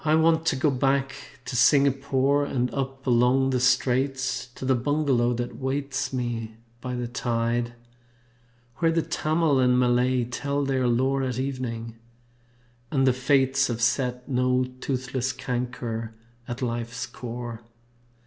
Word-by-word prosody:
I 155 0 +3
want 160 0 +3
to 150 - +3
go 135 +2 +2
back 135 +1 +1 0.3
to 125 - -5
Singapore 140 +2 +3
And 125 -3 -1
up 135 0 -4
along 125 +2 +3
the 130 - +1
Straits 130 +1 +1
To - - -6
the 130 - +3
bungalow 130 -2 +1
that 120 0 -4
waits 135 0 -2
me 120 -3 -3 0.3
by 125 0 -4
the 125 -1 -3
tide. 120 -1 -1 1.0
Where 165 -2 +2
the 165 -1 +1
Tamil 155 -3 +1
and 125 -1 +4
Malay 125 0 +2
tell 140 +4 -2
their 130 -2 +1
lore 130 +3 +2
At 130 -2 -2
evening 120 -4 -4 0.9
and 135 -3 +2
the 130 - +4
fates 135 +1 +2
Have 115 -2 -3
set 125 +1 0
no 125 0 +2 0.2
soothless 130 -1 -2
canker 120 -3 -4 0.3
at 120 +2 -5
life's 115 0 -3
core. 120 -1 -7
130 Hz, 140 wpm, -25 LUFS, 120-135 Hz, 1.0 s, and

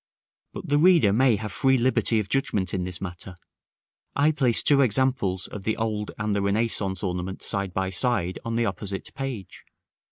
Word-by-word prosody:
But - - -7
that 175 - -10
the 145 - +3
reader 165 - +5
may 125 +1 +4
have 105 0 -5
free 130 +8 +2
liberty 120 -2 +2
of 105 - -3
judgment 100 -9 -1
in 90 -2 -1
this 90 -2 -7
matter, 90 0 -7 0.8
I 145 +2 +3
place 130 -6 +1
two 140 -1 +5
examples 120 -6 +1
of 105 - -7
the 110 +2 -1
old 110 -2 -2
and 105 -1 -1
the 100 - 0
Renaissance 100 -2 -1
ornament 90 0 -4
side 100 -1 0
by 95 +1 -2
side 95 -3 0
on 115 0 -3
the 115 0 +1
opposite 100 -1 -5
page. 130 -8 -6
105 Hz, 185 wpm, -25 LUFS, 95-130 Hz, 0.8 s, reader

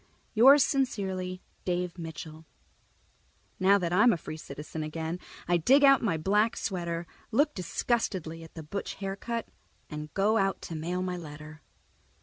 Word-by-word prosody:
_ - - -34 0.3
Yours 265 +5 +8
sincerely, 190 -9 -1 0.2
Dave 180 0 -2
Mitchell 160 -1 -8 1.1
Now 195 +2 +5
that 175 -3 -1
I'm 215 +6 +6
a 180 - +1
free 155 - -7
citizen 155 +1 -7
again, 160 +3 -4 0.3
I 175 0 +4
dig 270 - +5
out 275 -1 +7
my 185 -8 +1
black 210 +7 +2
sweater, 170 -3 -3 0.2
look 290 +6 +2
disgustedly 180 -3 -1
at 165 - -14
the 160 - -7
butch 200 +7 -5
haircut, 200 +4 -4 0.4
and 150 0 -6
go 210 +3 +3
out 195 -1 +1
to 165 - -6
mail 175 +4 -2
my 180 -1 -2
letter. 155 -1 -10
180 Hz, 150 wpm, -29 LUFS, 160-210 Hz, 1.1 s, Yours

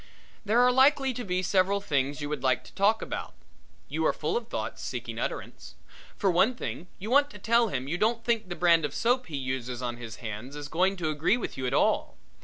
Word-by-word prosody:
There 220 +3 +2
are 250 0 +6
likely 270 +1 +4
to 245 - -5
be 185 -3 -1
several 195 +2 +2
things 145 -6 -1
you 145 - -3
would 150 -3 -3
like 130 -1 +1
to - - -15
talk 210 +3 +2
about. - - -5 0.5
You - - -2
are - - +2
full - - -2
of 475 - -2
thoughts - - -4
seeking - - -5
utterance. - - -5 0.4
For 195 -3 +2
one 195 +8 +3
thing 180 -6 -5
you 215 +5 -6
want 285 +2 +5
to - - -11
tell 235 +1 +3
him 135 -8 -3
you 175 +5 -2
don't 230 +2 +1
think 225 -4 0
the 175 - -4
brand 170 -2 +4
of 145 -2 -3
soap 250 +2 +1
he 150 -4 -4
uses 130 -2 -3
on 120 -1 -3
his 115 -2 -8
hands 115 +4 -7
is 145 0 -7
going 185 +4 +1
to 160 -3 -1
agree 155 +9 +2
with 245 - -5
you 130 - -3
at - - -2
all. - - +1
180 Hz, 230 wpm, -28 LUFS, 140-230 Hz, 0.5 s, are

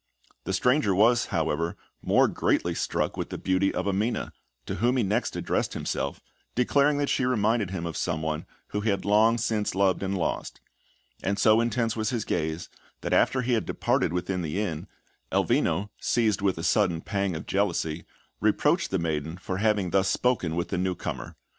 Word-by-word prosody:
The - - -2
stranger 125 -7 +2
was, 120 +5 +4
however, 80 0 -1 0.2
more - - +4
greatly - - 0
struck - - -1
with - - -3
the - - -5
beauty 95 +1 +1
of - - -2
Amina, 105 +5 -1 0.3
to - - -3
whom 125 +2 +2
he 120 - +2
next 100 +1 0
addressed - - -1
himself, 70 - -3 0.4
declaring 140 +4 +3
that 145 0 0
she 130 - +1
reminded 110 -4 +1
him 90 -3 -4
of 85 - -4
someone 80 0 -2 0.2
whom 105 - -2
he 110 - 0
had 100 -2 -1
long 110 +3 +4
since 110 -3 -1
loved 95 -1 +2
and 95 0 -1
lost; 85 - -3 0.6
and 100 +1 -1
so 110 +1 +5
intense 115 -1 0
was 110 -1 -1
his 120 -5 -2
gaze, 80 +2 -2 0.3
that - - -2
after 130 -1 +3
he 125 +1 +1
had 110 - 0
departed - - +1
within 90 +1 -2
the 85 +3 -2
inn, 85 -8 -3 0.4
Elvino, 95 +6 +1
seized 110 -5 +1
with 95 -3 +1
a 80 - -5
sudden 90 -5 +2
pang 100 -2 -1
of 80 - -6
jealousy, 85 -5 -1 0.4
reproached - - +2
the 95 - 0
maiden 80 -1 -2
for 95 0 -4
having 105 -3 +1
thus 95 0 +3
spoken 95 -9 +1
with 85 +1 -2
the 95 - -1
newcomer. 90 -1 -3
100 Hz, 180 wpm, -27 LUFS, 85-115 Hz, 0.6 s, so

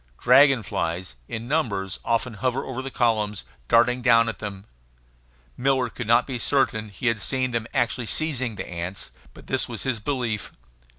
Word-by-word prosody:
Dragon 135 -4 +6
flies, 85 -4 -2
in 115 +1 -5
numbers, 100 - -1
often 115 +1 0
hover 125 +5 -1
over 130 -1 -4
the 135 - -5
columns, 110 - 0 0.2
darting 125 +2 +4
down 115 -1 +5
at 115 - -6
them; 100 -2 -6 0.9
Miller 130 -2 +1
could 120 - -6
not 120 +2 +5
be 130 -3 -4
certain 110 -5 +1
he 100 - -8
had 115 -3 +2
seen 130 +1 0
them 115 -2 -2
actually 120 0 0
seizing 130 -7 -1
the - - -5
ants, 85 -3 -5 0.2
but - - -14
this - - -1
was - - -5
his 130 -4 -1
belief. 115 -3 -2
115 Hz, 170 wpm, -25 LUFS, 105-130 Hz, 0.9 s, Dragon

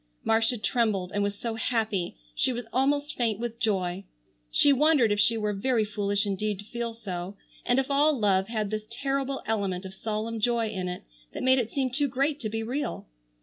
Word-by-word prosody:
Marcia 225 +2 +2
trembled 210 -4 0
and 205 - +1
was 200 0 0
so 230 +2 -3
happy 220 - -1 0.2
she 255 - +1
was 240 -1 -4
almost 285 +3 +1
faint 225 -4 0
with 235 -1 -4
joy. 190 -4 0 0.5
She 285 - +5
wondered 280 -5 +4
if 205 - +1
she 225 +2 +4
were 210 -1 0
very 220 +2 +1
foolish 205 0 0
indeed 205 +1 -1
to 205 - -9
feel 235 +1 -4
so, 190 -3 -5 0.3
and 245 - +3
if 270 +1 +1
all 290 +1 +4
love 195 -3 +2
had 215 -3 -2
this 215 0 -3
terrible 270 +2 -2
element 200 -4 -1
of 190 - -7
solemn 220 +3 -3
joy 230 0 +1
in 185 -4 -3
it 180 0 -5 0.3
that - - -4
made 260 0 +5
it 230 -2 -2
seem 265 -2 0
too 285 +3 +2
great 275 +3 0
to 220 - -3
be 225 +1 -2
real. 270 +6 -3
225 Hz, 200 wpm, -27 LUFS, 205-255 Hz, 0.5 s, She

